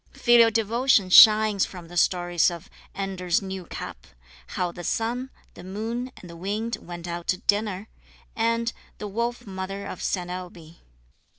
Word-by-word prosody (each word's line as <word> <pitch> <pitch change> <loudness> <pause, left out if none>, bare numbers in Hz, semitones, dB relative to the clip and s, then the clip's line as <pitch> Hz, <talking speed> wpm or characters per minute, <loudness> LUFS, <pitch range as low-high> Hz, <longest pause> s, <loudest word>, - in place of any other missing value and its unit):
Filial 240 -2 +5
devotion 225 -2 +2
shines 215 -1 +8
from 180 -3 -7
the 175 - -12
stories 175 0 +2
of 170 -2 -9 0.2
"Anders' 190 -3 -1
New 190 -2 -6
Cap," - - -8 0.4
"How 180 -1 -2
the 175 - -9
Sun, 240 +7 -2 0.2
the - - -12
Moon, 225 +7 -4
and 180 - -12
the 170 - -11
Wind 210 +6 -3
went 175 0 -8
out 170 0 -5
to 185 - +1
Dinner," 205 0 -1 0.5
and 230 +1 0 0.2
"The 210 - -6
Wolf 235 +4 -3
Mother 195 0 -6
of 185 - -7
Saint 180 -2 -2
Ailbe." 175 -3 -9
195 Hz, 155 wpm, -25 LUFS, 175-225 Hz, 0.5 s, shines